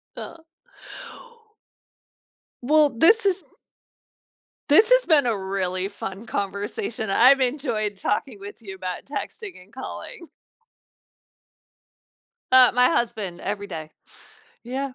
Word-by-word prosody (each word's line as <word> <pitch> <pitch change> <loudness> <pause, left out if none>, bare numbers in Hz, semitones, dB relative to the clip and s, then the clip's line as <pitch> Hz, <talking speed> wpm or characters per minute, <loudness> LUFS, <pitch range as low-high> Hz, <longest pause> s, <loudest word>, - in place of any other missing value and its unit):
Uh. 330 - -8 2.2
Well, 300 +2 +4
this 435 - +5
has 385 -1 +1 1.3
this 415 +10 +6
has - - +6
been 300 -5 +4
a 230 -3 +1
really 190 -1 -2
fun 195 +2 -8
conversation. 205 - -4
I've 255 +7 +6
enjoyed 245 -6 -1
talking 210 +3 -2
with 205 +3 -10
you 195 -3 -8
about 185 -1 -6
texting 360 - -7
and 200 - -26
calling. 290 +5 -8 2.2
Uh, 255 -1 +7
my 250 0 +4
husband, 210 - -2
every 200 0 -4
day, 155 -1 -7 0.7
yeah. 260 +2 -4
235 Hz, 105 wpm, -23 LUFS, 200-285 Hz, 2.2 s, Uh